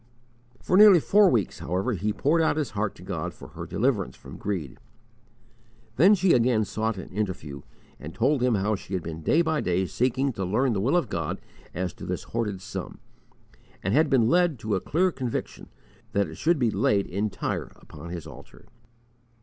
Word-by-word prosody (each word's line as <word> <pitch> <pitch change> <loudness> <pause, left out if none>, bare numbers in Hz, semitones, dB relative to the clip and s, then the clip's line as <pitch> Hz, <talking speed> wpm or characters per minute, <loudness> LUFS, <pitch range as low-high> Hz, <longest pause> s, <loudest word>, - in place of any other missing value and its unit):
For 185 - +2
nearly 205 -4 +9
four 200 +5 +5
weeks, 110 - 0
however, 95 +8 -1
he 105 +2 -1
poured 155 +9 +1
out 160 -1 +2
his 150 -3 -2
heart 105 -1 -2
to - - -14
God - - -4
for - - -12
her - - -8
deliverance 65 - 0
from - - -12
greed. 85 -11 -4 1.2
Then 190 +9 +6
she 185 -1 +3
again 115 -3 +3
sought 110 0 -2
an 95 - -8
interview 90 -9 -4 0.4
and 75 - -8
told 130 +3 +2
him 125 -2 +3
how 105 +2 0
she 95 -1 -5
had 90 - -3
been 80 -1 -6
day 155 - +3
by 160 -2 0
day 90 +1 0
seeking 130 +6 0
to 95 - -4
learn 115 +7 +1
the 95 - -1
will 135 - +2
of 170 - 0
God 85 -6 -3 0.4
as 90 0 -2
to - - -10
this - - -3
hoarded 105 -5 -3
sum, - - -6 0.9
and 95 - 0
had 155 +2 +4
been 120 -4 +4
led 175 0 +3
to 110 -1 -2
a 95 - 0
clear 185 +4 +1
conviction 130 -6 -5 0.4
that 100 -2 +1
it 80 - -9
should 170 - +2
be 120 -5 +1
laid 100 -2 +2
entire 100 +3 -3
upon 85 - -12
His 85 -2 -6
altar. 75 -5 -13
110 Hz, 190 wpm, -26 LUFS, 95-145 Hz, 1.2 s, nearly